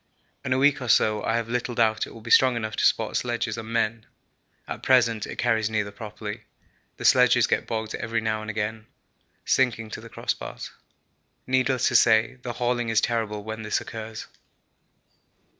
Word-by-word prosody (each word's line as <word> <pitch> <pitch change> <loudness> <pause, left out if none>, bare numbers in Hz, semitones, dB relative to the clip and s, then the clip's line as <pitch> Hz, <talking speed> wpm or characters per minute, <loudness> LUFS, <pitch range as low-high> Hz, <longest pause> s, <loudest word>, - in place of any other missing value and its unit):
In 130 - -4
a 130 - +3
week 140 +1 +3
or 125 - -4
so 110 -2 +3
I 115 - 0
have 115 -1 -1
little 120 0 -2
doubt 110 -2 +2
it - - -12
will 115 - -12
be 115 - -7
strong 130 -2 +6
enough 110 -2 -3
to - - 0
support - - +2
sledges 120 -3 -2
and 115 0 -7
men. 115 -1 -1 0.6
At - - -6
present 115 -4 +3
it - - -7
carries 110 -3 +1
neither 105 -2 -1
properly. 105 0 -7 0.6
The - - -6
sledges - - +5
get - - -1
bogged 110 -1 -3
every 115 +1 -2
now 110 -1 -2
and 110 - -7
again, 110 0 -3 0.6
sinking 115 -4 +1
to - - -6
the 115 - -11
crossbars. - - -5 0.7
Needless 130 -1 +1
to - - -3
say, 115 +3 +4
the 125 -1 -5
hauling 120 0 -1
is 110 -1 +3
terrible 110 -3 -1
when 110 +1 -6
this 105 -1 -1
occurs. 110 -1 -7
115 Hz, 180 wpm, -25 LUFS, 110-120 Hz, 0.7 s, strong